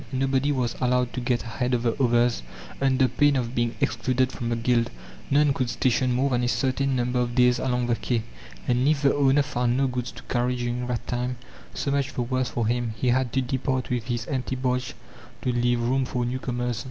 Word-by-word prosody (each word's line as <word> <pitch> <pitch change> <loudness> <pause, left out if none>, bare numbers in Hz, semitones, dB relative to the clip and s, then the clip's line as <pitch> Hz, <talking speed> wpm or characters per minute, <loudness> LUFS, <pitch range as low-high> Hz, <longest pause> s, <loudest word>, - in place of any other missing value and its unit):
Nobody 135 +2 +1
was 125 -4 -1
allowed 125 -1 +1
to 125 - -3
get 120 -1 0
ahead 125 +2 -1
of 120 - -2
the 115 -2 +2
others 120 - +3 0.4
under 135 -1 +3
pain 145 +4 +3
of 120 -2 -1
being 120 -1 0
excluded 130 +2 +1
from 120 -2 -4
the 120 - +1
guild. 115 0 +1 0.4
None 145 0 +4
could 130 -3 -1
station 130 +1 +1
more 130 +3 +1
than 125 -1 +1
a - - +1
certain 135 +2 0
number 125 0 0
of 120 -1 -1
days 125 -1 +4
along 125 -1 0
the 120 -1 +1
quay; 115 -1 -1 0.4
and 125 +2 +2
if 150 -1 +2
the 140 - +4
owner 140 0 +4
found 125 -3 0
no 135 - +2
goods 125 -2 -3
to - - -11
carry 125 0 0
during 120 0 -2
that 125 -2 -3
time, 125 0 -2 0.4
so 140 - -1
much 140 -2 0
the 125 - 0
worse 130 0 -1
for 115 0 -1
him; 120 -1 -1
he 125 - +1
had 125 -1 +1
to 135 - +2
depart 130 0 -2
with 120 -3 -1
his 120 -2 -2
empty 130 0 -2
barge 125 +1 -1 0.5
to 125 - +1
leave 120 0 +1
room 130 +3 +1
for 125 -1 -2
newcomers. 120 -1 -2
125 Hz, 215 wpm, -25 LUFS, 120-130 Hz, 0.5 s, None